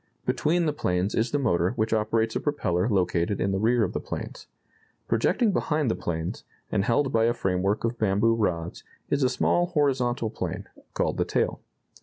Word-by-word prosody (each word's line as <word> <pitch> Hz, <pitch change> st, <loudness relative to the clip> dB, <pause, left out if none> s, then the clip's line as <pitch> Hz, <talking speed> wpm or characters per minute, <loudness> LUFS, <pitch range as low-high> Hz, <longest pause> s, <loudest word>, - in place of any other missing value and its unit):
Between 170 Hz, +3 st, +1 dB
the 150 Hz, -, +1 dB
planes 90 Hz, -6 st, -1 dB
is 115 Hz, +2 st, +1 dB
the 145 Hz, -, 0 dB
motor 95 Hz, -9 st, +1 dB
which 110 Hz, +1 st, -1 dB
operates 110 Hz, +1 st, +1 dB
a -, -, +1 dB
propeller 105 Hz, -, 0 dB
located 90 Hz, -1 st, +1 dB
in 95 Hz, -, 0 dB
the 95 Hz, -, 0 dB
rear 115 Hz, +2 st, +3 dB
of -, -, -2 dB
the -, -, -1 dB
planes. -, -, -7 dB, 0.6 s
Projecting 200 Hz, -, +2 dB
behind 150 Hz, -8 st, 0 dB
the -, -, -1 dB
planes, 80 Hz, 0 st, -4 dB, 0.3 s
and 100 Hz, -, +1 dB
held 125 Hz, +5 st, +1 dB
by 115 Hz, 0 st, +3 dB
a 120 Hz, +1 st, +2 dB
framework 95 Hz, +1 st, 0 dB
of 115 Hz, +1 st, -2 dB
bamboo 110 Hz, +2 st, +3 dB
rods, 90 Hz, -7 st, -2 dB, 0.3 s
is 145 Hz, -, +2 dB
a 130 Hz, -, +3 dB
small 175 Hz, +6 st, +1 dB
horizontal 130 Hz, -8 st, 0 dB
plane, -, -, -5 dB, 0.3 s
called -, -, 0 dB
the -, -, +1 dB
tail. -, -, -1 dB
115 Hz, 185 wpm, -26 LUFS, 95-130 Hz, 0.6 s, rear